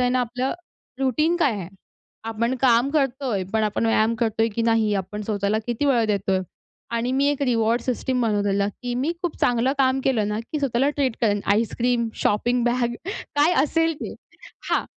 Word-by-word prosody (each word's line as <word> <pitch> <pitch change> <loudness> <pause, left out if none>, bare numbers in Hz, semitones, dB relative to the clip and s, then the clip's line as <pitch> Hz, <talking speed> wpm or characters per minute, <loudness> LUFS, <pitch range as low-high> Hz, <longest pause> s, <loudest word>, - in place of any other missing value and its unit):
आहे 250 - +3
ना 255 - +2
आपलं, 250 +2 -2 0.5
रूटीन 305 +6 +2
काय 310 -7 +2
आहे? 195 -5 -5 0.6
आपण 230 +3 -1
काम 250 +1 +4
करतोय 265 -8 0
पण 220 - +2
आपण 215 +2 0
व्यायाम 225 0 +3
करतोय 225 0 +1
की 230 - 0
नाही? 225 -2 +2
आपण 200 +2 -4
स्वतःला 205 0 0
किती 240 +4 -1
वेळ 245 -5 +3
देतोय? 195 -2 +1 0.5
आणि 235 +2 0
मी 270 +2 +2
एक 290 -1 0
रिवॉर्ड 230 -2 +2
सिस्टम 250 +1 -1
बनवलेला, 205 -3 +1
की 245 +4 -5
मी 270 +6 0
खूप 350 -3 -2
चांगलं 245 +2 +2
काम 265 -1 +3
केलं 225 -6 +1
ना, 210 +1 -2
की 265 +7 -5
स्वतःला 270 0 +1
ट्रीट 275 -5 -1
करेन: 205 -3 +2
आईसक्रीम, 235 +2 0 0.2
शॉपिंग 240 +4 +1
बॅग 240 0 +1
काय 320 -4 0
असेल 325 +2 +1
ते, - - -5 0.6
हां. - - +2
240 Hz, 175 wpm, -23 LUFS, 220-265 Hz, 0.6 s, काम